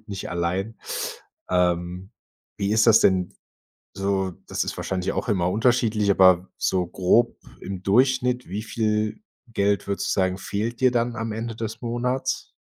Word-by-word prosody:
absolut 110 - -33
nicht 100 -1 -5
allein. 90 +6 -2 0.7
Ähm, 90 +1 0 0.5
wie 100 0 0
ist 110 +1 +4
das 115 -1 +7
denn? 90 -2 +2 0.6
So, 95 -1 -1 0.2
das - - -1
ist - - -5
wahrscheinlich 95 -1 -2
auch - - -3
immer 90 -3 +1
unterschiedlich, 110 -1 +2
aber 95 -1 +5
so 90 -1 +1
grob 95 +7 +2 0.2
im 95 -1 -6
Durchschnitt, 125 +4 +2
wie 100 +4 -4
viel 110 - -1 0.3
Geld, 100 -3 0
würdest 100 - -1
du - - +1
sagen, 95 -1 +1
fehlt 110 +5 -3
dir 130 - +6
dann 120 0 0
am 110 0 -3
Ende 115 +1 -4
des 110 0 -5
Monats? 125 +2 -2
105 Hz, 155 wpm, -24 LUFS, 95-115 Hz, 0.7 s, das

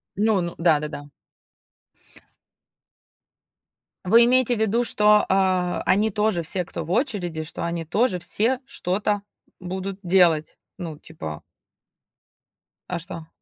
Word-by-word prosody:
Ну 210 -1 +2
ну 170 -1 -5
да-да-да. 150 -3 0 2.9
Вы 230 +5 +6
имеете 250 0 +4
в 220 - -5
виду, 220 +2 +2
что, 210 -2 +4
э, 185 -2 +1
они 210 +4 +3
тоже 210 -3 0
все, 180 +2 -1
кто 165 - -6
в 160 - -7
очереди, 180 - -1
что 160 +1 -6
они 170 -1 -3
тоже 205 +3 +1
все 235 +8 +1
что-то 205 -4 -2 0.4
будут 190 +2 -5
делать? 175 -4 +2 0.2
Ну, 165 -4 -6
типа 80 - -8 1.5
А 175 - -2
что? 165 -2 -7
185 Hz, 115 wpm, -23 LUFS, 170-210 Hz, 2.9 s, Вы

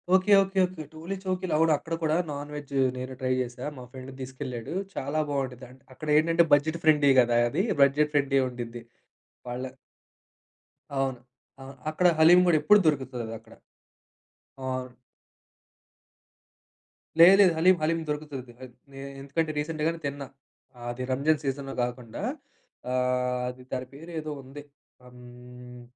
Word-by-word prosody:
Okay. 190 +2 +2
Okay. 195 0 -2
Okay. 175 -4 -9
టోలిచౌకిలో, 185 +2 -4
అవును 160 0 +4
అక్కడ 165 +3 -7
కూడా 155 0 +2 0.2
నాన్-వెజ్జు 145 -1 -5 0.2
నేనూ 130 +1 -6
ట్రై 130 0 0
జేసా. 125 0 -5
మా 125 - -8
ఫ్రెండు 130 0 -9
దీసుకెళ్ళాడూ. 130 0 -6 0.2
చాలా 140 +3 -2
బావుండ్డిద్దంటే, 130 -2 -5
అక్కడేంటంటే 155 +3 +3
బడ్జెట్ 155 +3 +3
ఫ్రెండ్లీ 150 -3 +5
గదా 120 0 +2
అది! 185 - 0 0.2
బడ్జెట్ 145 +2 +4
ఫ్రెండ్లీ 140 -1 +2
ఉండిద్ది. 120 -1 -7 0.7
వాళ్ళ 125 +1 -4 1.3
అవును. 135 -2 -1 0.4
ఆహ్, 135 0 -10
అక్కడ 175 +3 +2
హలీం 170 +3 +8
గూడా 165 -3 +5
ఎప్పుడు 210 +7 +6
దొరుకుతదదక్కడ. 115 -6 -3 1.1
ఓహ్! 130 - -3
అవును. 125 -1 -7 2.2
లేదు. 175 +3 +10
లేదు. 185 -4 +6
హలీం 185 +3 +5
హలీం 165 +2 +1
దొరుకుతుది. 145 -5 -5
అద్ 125 -2 -11 0.2
నే 135 - -10 0.2
ఎందుకంటే, 155 +3 -1
రీసెంట్ 150 0 -3
గానే 165 0 -2
తిన్నా. 140 -1 -6 0.6
ఆది 120 +1 -4
రంజాను 145 +4 +2
సీజన్‌లో 135 0 -3
గాకుండా 120 -2 -5 0.7
ఆహ్, 125 0 0
అది 125 0 -7
దాని 130 -1 -3
పేరేదో 155 +1 -6
ఉంది. 135 +2 -10 0.4
ఆ! 125 - -15
హ్మ్. 125 0 -13
140 Hz, 130 wpm, -27 LUFS, 125-155 Hz, 2.2 s, లేదు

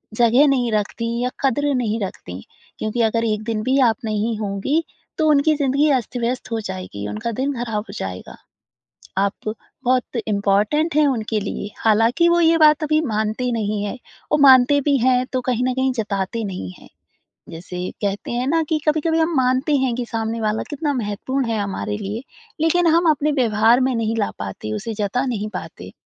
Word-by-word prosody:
जगह 240 +5 +5
नहीं 250 -4 +1
रखतीं 230 +3 -2
या 250 - 0
कदर 280 +2 +1
नहीं 225 -3 -1
रखतीं। 95 - -6 0.4
क्योंकि 220 +2 -1
अगर 230 +1 +1
1 215 -1 -1
दिन 220 -1 -2
भी 265 +4 +2
आप 225 - 0
नहीं 215 +1 -1
होंगी 215 +10 -1 0.3
तो 315 - +2
उनकी 300 +1 +4
ज़िंदगी 285 +1 +2
अस्त-व्यस्त 245 -1 -2
हो 225 - -1
जाएगी, 185 - -6
उनका 235 +2 -3
दिन 270 +5 -1
ख़राब 215 -3 -3
हो - - -8
जाएगा। 95 -1 -6 0.8
आप 200 +2 -1 0.3
बहुत 255 0 0
इम्पोर्टेंट 210 +10 +1
हैं 305 -1 +5
उनके 220 -4 -1
लिए, 200 0 -5
हालाँकि 230 +9 +3
वो 345 - +3
ये 330 0 +4
बात 305 0 +5
अभी 305 +1 +2
मानते 220 +3 -1
नहीं 210 -2 -1
हैं 205 +5 -4 0.3
और 300 - +3
मानते 270 +1 +7
भी 285 -1 +2
हैं 250 +1 +3
तो 255 - 0
कहीं 245 0 0
न 255 - -1
कहीं 260 0 +1
जताते 215 -1 -2
नहीं 180 - -5
हैं। - - -16 0.6
जैसे 180 +2 -6
कहते 200 +1 -2
हैं 250 +2 -1
ना 325 +2 +2
कि 310 -1 +1
कभी-कभी 320 +2 +2
हम 325 0 +1
मानते 260 +4 +2
हैं 260 -3 0
कि 245 -1 -3
सामने 225 0 -3
वाला 215 0 0
कितना 290 0 -2
महत्वपूर्ण 250 +3 -2
है 220 -2 0
हमारे 205 +1 -3
लिए। 210 +4 -5 0.4
लेकिन 340 +2 +3
हम 340 -1 +4
अपने 300 +1 0
व्यवहार 230 -2 +3
में 260 0 +1
नहीं 225 0 -1
ला 205 - 0
पाते, 100 +2 -5
उसे 225 - -4
जता 215 +5 -1
नहीं 215 -4 -2
पाते। 100 - -8
235 Hz, 185 wpm, -21 LUFS, 210-275 Hz, 0.8 s, मानते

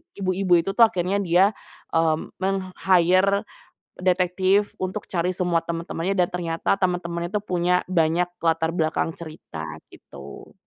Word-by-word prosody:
ibu-ibu 185 -1 0
itu 195 - -5
tuh 230 - +9
akhirnya 190 -1 -1
dia, 180 +2 +4 0.5
eee, 160 -1 +3 0.2
meng-hire 190 +1 +2 0.6
detektif 185 +2 +2
untuk 185 +3 -3
cari 180 0 -1
semua 175 -3 +1
teman-temannya 170 +2 -3
dan 175 - +4
ternyata 170 +1 -1
temen-temennya 175 -1 -1
itu 205 - +1
punya 180 0 +2
banyak 170 0 +2 0.2
latar 165 0 +1
belakang 160 0 0
cerita 155 - -8 0.3
gitu. 70 0 -12
180 Hz, 125 wpm, -23 LUFS, 165-185 Hz, 0.6 s, tuh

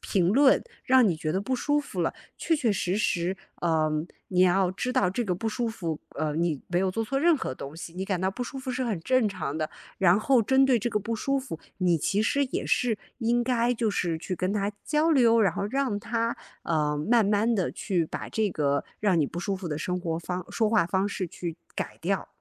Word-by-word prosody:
评 180 -3 +1
论， 265 +6 +5 0.2
让 255 -2 +5
你 170 - +1
觉 155 0 -3
得 190 - 0
不 260 +6 -1
舒 290 +3 +1
服 190 -10 -5
了， - - 0 0.2
确 325 -2 +1
确 245 -7 +1
实 190 0 -1
实， 185 -3 0 0.3
嗯， 155 -1 +1 0.2
你 180 -1 +1
要 185 0 +4
知 250 +6 -2
道 200 -9 +3
这 230 +6 -1
个 185 - -1
不 225 +6 -2
舒 235 +1 -1
服， 170 -8 -3 0.2
呃， 150 -1 -1
你 160 -4 0
没 175 0 0
有 190 -1 +1
做 225 +4 -2
错 270 +5 -1
任 330 0 +5
何 130 - -4
东 140 +3 -8
西， 165 0 -8
你 190 +1 -3
感 190 -3 -1
到 190 - +1
不 245 +6 -4
舒 270 +2 -6
服 260 0 -8
是 255 +1 -2
很 215 -7 -1
正 250 +4 +2
常 170 -6 -4
的。 155 -1 -2 0.3
然 185 +1 +5
后 245 +1 +3
针 265 +4 +4
对 265 -2 +4
这 240 +3 -2
个 210 - +1
不 230 +3 -3
舒 275 +5 0
服， 260 - -7 0.2
你 180 -2 +3
其 195 +6 0
实 280 +6 +2
也 255 - -3
是 230 -4 +1 0.2
应 240 0 +1
该 245 -1 +2
就 225 -1 0
是 175 -5 -1
去 185 - -4
跟 185 +2 -1
他 205 0 -1
交 315 +2 +2
流， 230 -4 +5
然 200 - +3
后 200 - -2
让 260 -3 -1
他， 230 +1 -1 0.3
呃， 150 -2 +1
慢 230 -2 +5
慢 215 +3 +2
地 190 -4 0
去 180 -5 -1
把 - - -6
这 215 -2 0
个 140 -4 0
让 195 -5 +2
你 150 - +3
不 170 - -5
舒 195 +3 -1
服 185 -3 -5
的 150 0 -3
生 180 +3 -2
活 165 -2 -2
方 180 +1 -4
说 220 -2 +1
话 220 -4 +3
方 190 +3 0
式 185 -3 -3
去 170 -1 -5 0.2
改 - - -4
掉。 190 +3 -1
200 Hz, 255 characters per minute, -27 LUFS, 175-235 Hz, 0.3 s, 论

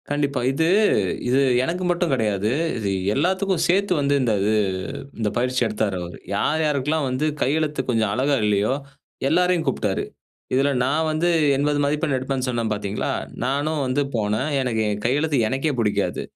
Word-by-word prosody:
கண்டிப்பா. 145 -2 0
இது, 160 +4 +1 0.6
இது 130 +2 +3 0.2
எனக்கு 180 +5 -2
மட்டும் 175 -1 0
கிடையாது. 105 -3 0 0.3
இது 105 -3 -2 0.2
எல்லாத்துக்கும் 185 +3 +1
சேர்த்து 190 +2 +2
வந்து 140 0 +1
இந்த 120 -3 +1
இது 105 +2 +2 0.6
இந்த 110 -2 0
பயிற்சி 125 +1 +1
எடுத்தாரு 105 -3 -1
அவரு. 85 0 -8 0.2
யார் 155 +1 +1
யாருக்கெல்லாம் 150 0 0
வந்து 130 +4 -1 0.2
கையெழுத்து 150 +1 0
கொஞ்சம் 110 -3 +1
அழகா 140 +4 +1
இல்லயோ! 105 +4 +2 0.5
எல்லாரையும் 180 +1 +2
கூப்பிட்டாரு. 135 - -1 0.5
இதில 135 +2 +3
நான் 150 +5 +1
வந்து 155 +3 +1 0.3
80 145 +1 +1
மதிப்பெண் 150 0 0
எடுப்பேன்னு 130 0 -2
சொன்னேன் 115 -3 -1
பார்த்தீங்களா, 105 0 -2 0.3
நானும் 145 +3 0
வந்து 130 +3 +1
போனேன். 110 +6 0
எனக்கு 115 -4 0 0.2
கையெழுத்து 145 +5 +1
எனக்கே 135 +5 -1
பிடிக்காது. 105 -2 0
135 Hz, 145 wpm, -22 LUFS, 115-155 Hz, 0.6 s, இது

